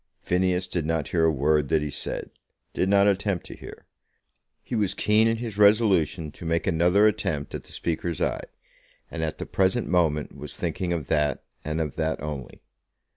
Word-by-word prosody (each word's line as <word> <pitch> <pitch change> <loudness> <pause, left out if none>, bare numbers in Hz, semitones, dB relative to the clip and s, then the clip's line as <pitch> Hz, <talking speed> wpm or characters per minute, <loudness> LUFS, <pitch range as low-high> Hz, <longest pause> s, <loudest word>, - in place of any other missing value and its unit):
Phineas 90 0 +1
did 85 - -2
not 80 -2 -1
hear 80 -2 +2
a 80 - +4
word 75 0 +1
that 80 -2 +2
he 75 - -3
said; - - -4 0.4
did 95 - 0
not 100 0 +5
attempt 100 -2 0
to - - -9
hear. - - -12 0.8
He - - -8
was 105 -5 0
keen 110 +1 +3
in 115 0 +1
his 110 -3 -5
resolution 95 -7 +3
to - - -12
make 85 0 0
another 90 +4 +4
attempt 90 -9 0
at - - -6
the - - -15
Speaker's 85 -1 -3
eye, - - -1 0.7
and 85 - -4
at 80 - -3
the - - -5
present 95 +5 +1
moment 80 -4 +1
was - - -7
thinking 90 -2 -2
of 85 -4 -2
that, 75 -4 +1 0.2
and 75 +1 -2
of 80 -2 -3
that 80 -1 -1
only. 75 -4 -7
85 Hz, 185 wpm, -25 LUFS, 75-100 Hz, 0.8 s, not